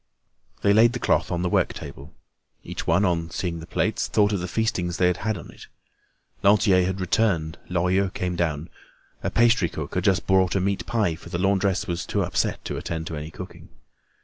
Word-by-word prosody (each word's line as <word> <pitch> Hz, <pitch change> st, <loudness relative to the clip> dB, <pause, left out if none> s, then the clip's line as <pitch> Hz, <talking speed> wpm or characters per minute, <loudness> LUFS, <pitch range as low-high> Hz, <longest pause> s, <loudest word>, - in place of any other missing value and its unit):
They 100 Hz, -, +5 dB
laid 115 Hz, +3 st, +5 dB
the 125 Hz, -, -3 dB
cloth -, -, +1 dB
on 85 Hz, 0 st, -1 dB
the -, -, +1 dB
work -, -, +1 dB
table. 70 Hz, +3 st, -9 dB, 0.5 s
Each -, -, -6 dB
one, 85 Hz, +5 st, +3 dB
on 85 Hz, -2 st, 0 dB
seeing 85 Hz, 0 st, -3 dB
the 80 Hz, -, -10 dB
plates, 105 Hz, +5 st, 0 dB
thought 105 Hz, -1 st, +2 dB
of 100 Hz, -, 0 dB
the 90 Hz, -, -3 dB
feastings 90 Hz, -4 st, -1 dB
they 90 Hz, -, +3 dB
had 90 Hz, 0 st, +2 dB
had 110 Hz, +1 st, -2 dB
on 80 Hz, -, -10 dB
it. -, -, -14 dB, 0.7 s
Lantier 100 Hz, -2 st, +4 dB
had 95 Hz, +1 st, -2 dB
returned. 90 Hz, -4 st, 0 dB
Lorilleux 90 Hz, +2 st, +1 dB
came 90 Hz, -1 st, -3 dB
down. 80 Hz, -2 st, -2 dB, 0.5 s
A -, -, -1 dB
pastry 115 Hz, -7 st, +3 dB
cook 75 Hz, -2 st, -6 dB
had 90 Hz, -, -1 dB
just 95 Hz, -3 st, +2 dB
brought 95 Hz, -1 st, +3 dB
a -, -, +3 dB
meat 100 Hz, +1 st, -1 dB
pie, 105 Hz, -7 st, +1 dB
for 80 Hz, -, -11 dB
the -, -, -2 dB
laundress 95 Hz, +1 st, +1 dB
was 85 Hz, -3 st, -3 dB
too -, -, 0 dB
upset -, -, -1 dB
to -, -, -3 dB
attend 80 Hz, -1 st, -4 dB
to 80 Hz, -, -5 dB
any 75 Hz, +1 st, -6 dB
cooking. 90 Hz, +2 st, -10 dB
90 Hz, 205 wpm, -24 LUFS, 85-100 Hz, 0.7 s, They